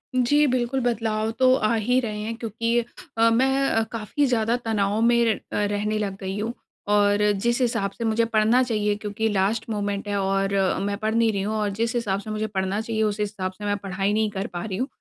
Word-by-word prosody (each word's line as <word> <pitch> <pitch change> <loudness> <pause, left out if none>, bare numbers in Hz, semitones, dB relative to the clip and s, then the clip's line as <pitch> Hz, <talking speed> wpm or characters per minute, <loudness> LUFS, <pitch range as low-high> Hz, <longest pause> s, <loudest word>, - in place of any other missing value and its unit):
जी 290 +4 +4
बिल्कुल 255 +2 0
बदलाव 220 -2 0
तो 255 0 +6
आ 215 -3 +1
ही 245 +4 +2
रहे 215 -4 -3
हैं 225 +2 -4
क्योंकि 230 +1 -1 0.4
अ, 230 0 +5
मैं 265 +3 +2
अ, 225 - +2
काफ़ी 230 +6 -1
ज़्यादा 230 -2 +1
तनाव 210 -1 0
में 235 0 +4
र 220 -2 +2 0.2
अ, 205 - +2
रहने 205 +1 -1
लग 200 -2 -3
गई 190 +1 -4
हूँ। 225 +3 -2 0.4
और 205 0 +3 0.2
जिस 235 +4 +1
हिसाब 200 -5 0
से 230 - -7
मुझे 225 +1 +2
पढ़ना 225 +2 +3
चाहिए 210 -3 0
क्योंकि 215 +1 -2
लास्ट 205 +3 0
मोमेंट 205 -1 -2
है 205 - -1
और 195 +1 0 0.3
मैं 200 0 -2
पढ़ 220 +1 -1
नहीं 230 -1 +3
रही 200 -2 -2
हूँ, 215 +2 -2
और 210 -1 0
जिस 230 +4 -2
हिसाब 200 -5 0
से 215 - -9
मुझे 215 0 -2
पढ़ना 195 0 -2
चाहिए 225 -1 -2
उस 210 0 -1
हिसाब 200 -3 -2
से 205 +2 -9
मैं 205 0 0
पढ़ाई 195 +1 -2
नहीं 215 0 +1
कर 195 -1 -3
पा 175 - -4
रही 190 -3 -4
हूँ, 255 +3 -1
215 Hz, 225 wpm, -24 LUFS, 205-230 Hz, 0.4 s, तो